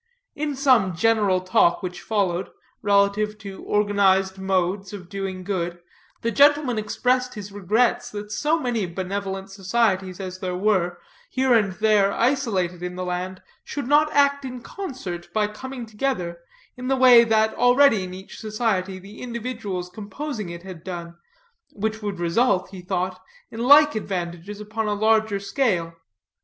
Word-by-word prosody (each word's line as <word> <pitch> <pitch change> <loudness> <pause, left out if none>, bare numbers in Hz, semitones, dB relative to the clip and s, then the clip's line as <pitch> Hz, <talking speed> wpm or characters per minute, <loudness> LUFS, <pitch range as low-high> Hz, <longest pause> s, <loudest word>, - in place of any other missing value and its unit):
In 295 -1 -3
some 250 - +3
general 205 -1 +2
talk 185 -1 +2
which 180 -1 -5
followed, 190 -4 -1 0.3
relative 205 +1 +2
to 200 -2 -9
organized 195 -2 +2
modes 190 +1 -1
of 185 -4 -9
doing 195 -2 -4
good, 175 -3 -3 0.4
the 230 - +1
gentleman 285 -1 +4
expressed 250 +4 0
his 205 -1 -7
regrets 220 +5 +1
that 210 -1 -7
so 300 +10 +1
many 235 - -1
benevolent 195 +2 -4
societies 195 -2 0
as 185 -1 -6
there 185 -1 -3
were, 180 -3 +1 0.3
here 260 -1 +2
and 210 -5 +3
there 210 -1 +3
isolated 215 -9 0
in 180 0 -4
the 185 0 -4
land, 180 +1 -4 0.2
should 285 -3 -5
not 300 +2 +4
act 280 0 +3
in 255 -2 -6
concert 250 - -6
by 215 -1 +2
coming 245 +4 -7
together, 210 -7 -3 0.4
in 250 0 -6
the 270 0 +2
way 250 -2 +8
that 220 -1 +2
already 245 -4 +4
in 180 - -6
each 190 +1 -10
society 210 -4 -1
the 195 +3 -12
individuals 230 -6 -4
composing 215 - -6
it 170 0 -8
had 185 -4 -10
done, 170 -2 -6 0.6
which 220 +1 -3
would 205 -3 -4
result, 185 +2 +1
he 190 -2 -9
thought, 185 0 -3 0.3
in 225 - -8
like 290 +5 +7
advantages 185 -1 -4
upon 215 +1 -3
a 210 - 0
larger 220 -1 +2
scale. 195 -5 0
205 Hz, 150 wpm, -23 LUFS, 185-235 Hz, 0.6 s, way